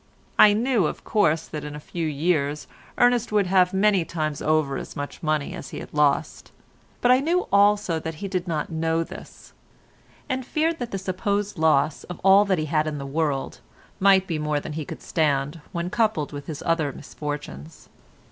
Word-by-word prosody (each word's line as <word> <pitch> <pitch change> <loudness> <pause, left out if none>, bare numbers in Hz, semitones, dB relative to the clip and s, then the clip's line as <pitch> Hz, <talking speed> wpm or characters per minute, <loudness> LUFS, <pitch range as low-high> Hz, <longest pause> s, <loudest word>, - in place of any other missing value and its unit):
I 210 - +8
knew, 225 -5 +2
of - - -6
course, 165 -7 +1
that 150 -1 -6
in 150 0 -6
a - - -6
few 165 +2 -4
years 150 -1 0 0.3
Ernest 245 -2 +3
would 210 -2 +3
have 180 -1 +3
many 195 -1 +3
times 155 -3 -3
over 155 -3 +1
as - - -8
much 145 0 -6
money 155 -2 -1
as - - -8
he - - -7
had - - -10
lost, 150 0 0 0.5
but 245 - +4
I 255 - +6
knew 340 +6 0
also 200 -4 +3
that 160 0 -5
he 200 +6 -5
did 185 -2 -3
not 160 -1 -2
know 165 0 0
this, - - -12 0.7
and 260 0 -2
feared 320 +5 -1
that 245 -2 -4
the 195 - -3
supposed 200 +1 -2
loss 155 -1 +2
of 180 - -8
all 195 +2 +6
he 180 -6 +1
had 155 0 0
in 150 -1 -3
the 140 - -6
world 140 -1 -2 0.4
might 190 -1 +5
be 165 -4 -3
more 150 -1 0
than 150 - -7
he 155 -1 -4
could - - -9
stand 150 0 0
when 175 -1 -3
coupled 215 -11 0
with 145 -1 -8
his 155 -3 -6
other 165 -4 +1
misfortunes. 135 - -7
165 Hz, 190 wpm, -24 LUFS, 150-200 Hz, 0.7 s, I